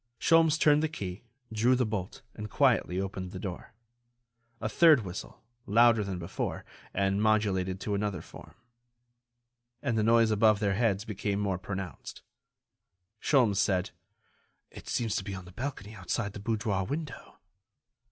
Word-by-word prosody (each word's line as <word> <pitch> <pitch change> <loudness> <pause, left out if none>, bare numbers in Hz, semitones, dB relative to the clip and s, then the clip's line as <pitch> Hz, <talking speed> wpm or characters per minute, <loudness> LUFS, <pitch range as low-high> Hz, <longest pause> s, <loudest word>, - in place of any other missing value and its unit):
Sholmes 165 -1 +4
turned 150 -2 +4
the 160 - 0
key, 100 - -6 0.3
drew 120 +4 +3
the 125 0 +1
bolt, 105 -3 -5
and 105 0 -7
quietly 115 -10 +2
opened 95 -1 -4
the 95 - -7
door. 95 +2 -7 0.8
A - - -2
third 150 -1 +5
whistle, 90 0 -8 0.2
louder 115 +1 +5
than 95 -2 -4
before, 85 -1 -4 0.3
and 100 +1 0
modulated 100 -4 +1
to 105 - -2
another 100 -1 -2
form. - - -13 1.2
And 115 - -1
the - - +2
noise 115 0 +4
above 110 -1 +4
their 100 -2 +1
heads 105 -1 +1
became 100 -1 -2
more 100 -3 -1
pronounced. 95 -1 -7 1.0
Sholmes 120 -9 +3
said: 95 0 +1 0.8
"It - - -12
seems 115 -4 -1
to - - -3
be 100 0 -5
on 90 -1 -8
the 90 - -12
balcony 110 -2 -6
outside 110 -2 -3
the 105 - -7
boudoir 105 -2 -1
window." 150 - -6
105 Hz, 150 wpm, -29 LUFS, 95-115 Hz, 1.2 s, third